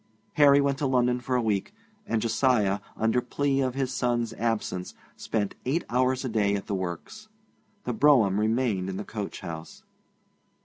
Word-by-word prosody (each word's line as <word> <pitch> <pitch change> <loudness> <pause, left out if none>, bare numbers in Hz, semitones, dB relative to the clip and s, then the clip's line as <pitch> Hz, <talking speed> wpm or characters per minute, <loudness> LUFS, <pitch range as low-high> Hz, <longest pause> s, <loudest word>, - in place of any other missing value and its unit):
Harry 140 -1 +6
went 140 0 +1
to 145 - 0
London 125 -1 +2
for 125 +1 -2
a 125 - +2
week, 105 - -1 0.3
and 110 -2 0
Josiah, 110 -4 +2 0.2
under 115 +3 +2
plea 135 +2 0
of 130 -1 -1
his 135 -1 -1
son's 120 -2 0
absence, 110 -5 -2 0.2
spent 105 -3 -2
eight 145 +7 0
hours 130 +1 +1
a - - -2
day 105 -2 +1
at 100 - -4
the - - -4
works. 95 - -5 0.6
The - - -2
brougham 125 - +4
remained 110 -4 0
in 95 - -4
the 105 - -4
coach 105 -2 -6
house. 80 -1 -8
120 Hz, 170 wpm, -27 LUFS, 105-130 Hz, 0.6 s, Harry